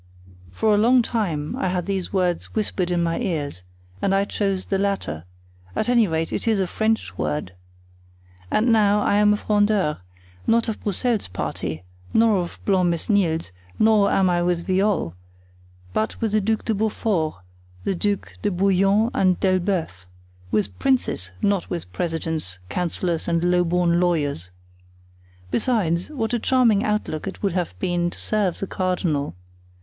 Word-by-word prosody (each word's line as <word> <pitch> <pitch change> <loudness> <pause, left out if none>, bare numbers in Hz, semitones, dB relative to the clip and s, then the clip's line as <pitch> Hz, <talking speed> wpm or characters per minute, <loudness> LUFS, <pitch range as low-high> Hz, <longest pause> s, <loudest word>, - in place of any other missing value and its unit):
For 210 - +1
a 205 - +4
long 245 +3 +5
time 170 -11 -2
I - - -1
had 180 -1 -1
these 195 -2 -2
words 180 -3 0
whispered 205 -4 -1
in 175 -1 +1
my 165 0 0
ears, 145 - -3 0.4
and 195 - +2
I 195 +1 +2
chose 195 -2 -1
the 195 - -1
latter; 190 - -2 0.5
at 220 - 0
any 235 -3 +4
rate, 160 -1 -2
it - - -3
is 220 -3 +3
a 190 - +2
French 220 - -1
word. 75 +3 -2 1.0
And 230 - +2
now, 210 -2 +4
I 205 - +2
am 210 0 +5
a 210 - +2
Frondeur—not 150 - 0
of 220 - -4
Broussel's 220 +2 0
party, 85 -2 -4 0.3
nor 225 -2 +5
of 175 -1 -5
Blancmesnil's, 175 - +1 0.3
nor 215 -2 +4
am 190 -1 +3
I 175 -1 +2
with 175 -1 0
Viole; 190 - +1 0.8
but 110 +3 -1
with 225 -2 0
the 215 0 +2
Duc 220 +2 -1
de 225 - +1
Beaufort, 205 -6 0 0.5
the - - 0
Ducs 200 +2 -2
de 205 - +1
Bouillon 195 +4 +2
and 185 -2 +2
d'Elbeuf; 180 - 0 0.4
with 100 -2 -1
princes, 250 - 0
not 200 -3 +1
with 165 - -5
presidents, 160 - -3
councillors 175 -1 -2
and 170 0 +1
low 180 0 +3
born 175 0 +2
lawyers. 145 - 0 1.0
Besides, 190 -8 +1
what 245 -6 -3
a 240 - +1
charming 230 -4 +3
outlook 210 -7 -2
it 195 - -7
would 195 -3 +1
have 175 - -2
been 175 - 0
to - - -9
serve 205 -5 0
the - - -3
cardinal! 180 - -1
185 Hz, 155 wpm, -23 LUFS, 165-210 Hz, 1.0 s, long